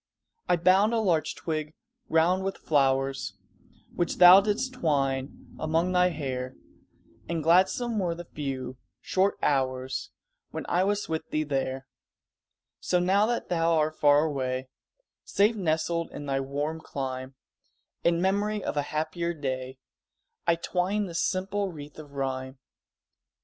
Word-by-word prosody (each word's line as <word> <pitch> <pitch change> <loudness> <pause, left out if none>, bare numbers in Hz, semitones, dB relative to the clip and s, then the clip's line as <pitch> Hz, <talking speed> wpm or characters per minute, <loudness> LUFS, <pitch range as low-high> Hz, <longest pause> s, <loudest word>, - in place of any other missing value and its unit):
I - - +5
bound 190 +6 +4
a - - +2
larch 175 -7 +1
twig 155 -1 -4 0.3
round 175 +4 +3
with 195 0 -3
flowers, 135 -8 +1 0.6
Which 175 - -1
thou 180 +2 +10
didst 215 +6 -1
twine 140 - -2
among 165 +3 +1
thy 180 0 +4
hair, 130 -5 -4 0.7
And 165 -2 -2
gladsome 190 +7 +3
were 175 -3 -1
the 175 +1 -8
few, 130 -5 -5 0.2
short 190 +2 +1
hours 130 -1 0 0.4
When - - -6
I 180 +2 +2
was 205 +1 0
with 160 -1 -3
thee 155 - 0
there; 135 -2 -2 0.9
So 180 - +1
now 195 +4 +3
that 240 0 -2
thou 165 -1 +2
art 155 -1 +1
far 145 +1 +5
away, 130 -3 -2 0.5
Safe 210 +3 +2
nestled 170 -2 -1
in 145 - -8
thy 135 -1 0
warmer 145 +4 -3
clime, 130 -3 -5 0.7
In 170 0 +3
memory 200 +2 0
of - - -3
a 145 - +2
happier 170 +2 -2
day 130 -3 -4 0.7
I 170 - +5
twine 185 +4 -1
this 170 -3 -2
simple 195 +1 -1
wreath 150 -2 -10
of 145 -2 -11
rhyme. 130 -1 -3
160 Hz, 140 wpm, -27 LUFS, 135-185 Hz, 0.9 s, thou